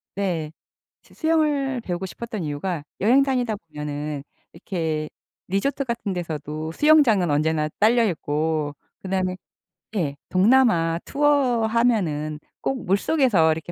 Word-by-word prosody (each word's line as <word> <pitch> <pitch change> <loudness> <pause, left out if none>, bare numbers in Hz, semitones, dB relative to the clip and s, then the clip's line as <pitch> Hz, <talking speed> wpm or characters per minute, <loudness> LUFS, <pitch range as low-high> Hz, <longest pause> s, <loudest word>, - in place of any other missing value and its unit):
네. 175 -6 -2 0.5
수 - - -22
수영을 295 -5 +1
배우고 180 -3 -3
싶었던 220 +2 -6
이유가 150 +2 -3 0.2
여행 245 +7 +5
다니다 250 -5 0
보면은 150 -3 -5 0.3
이렇게 160 -5 -3 0.4
리조트 235 +10 0
같은 235 -5 -3
데서도 155 -2 -4
수영장은 245 - +4
언제나 155 +1 +1
딸려있고 160 -9 +1 0.3
그다음에 185 -1 -1 0.6
예. 150 -8 -1
동남아 185 -5 +4
투어 280 -5 +2
하면은 190 -11 +1 0.2
꼭 265 -4 -2
물속에서 195 - +3
이렇게 160 +2 -4
185 Hz, 285 characters per minute, -23 LUFS, 155-240 Hz, 0.6 s, 여행